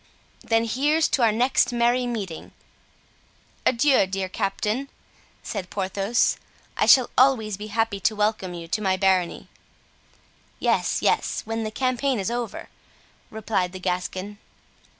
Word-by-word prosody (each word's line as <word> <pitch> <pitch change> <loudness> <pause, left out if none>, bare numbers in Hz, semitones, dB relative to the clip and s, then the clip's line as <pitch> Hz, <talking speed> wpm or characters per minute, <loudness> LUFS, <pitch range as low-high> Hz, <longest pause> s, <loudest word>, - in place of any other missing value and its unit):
"Then, 225 0 +2
here's 295 +7 +2
to 265 - +1
our 230 -2 +5
next 245 +4 +2
merry 240 +1 +1
meeting!" 200 -9 -5 1.1
"Adieu, 260 -4 +3
dear 190 0 -3
captain," 210 +7 -2 0.5
said 190 -4 -5
Porthos, 195 +3 0 0.4
"I - - +1
shall 255 -3 +6
always 240 -6 +3
be 210 +2 -8
happy 225 -1 -1
to 215 +2 +1
welcome 210 -4 -1
you 170 -1 -8
to 215 - -2
my 190 -2 +1
barony." 185 -2 +1 1.1
"Yes, - - 0
yes, - - +1
when 225 0 -3
the 215 - -3
campaign 255 +2 0
is 195 +4 -2
over," 240 -3 -4 0.6
replied 210 -4 -2
the 185 - -7
Gascon. 185 +2 -3
215 Hz, 130 wpm, -24 LUFS, 190-240 Hz, 1.1 s, shall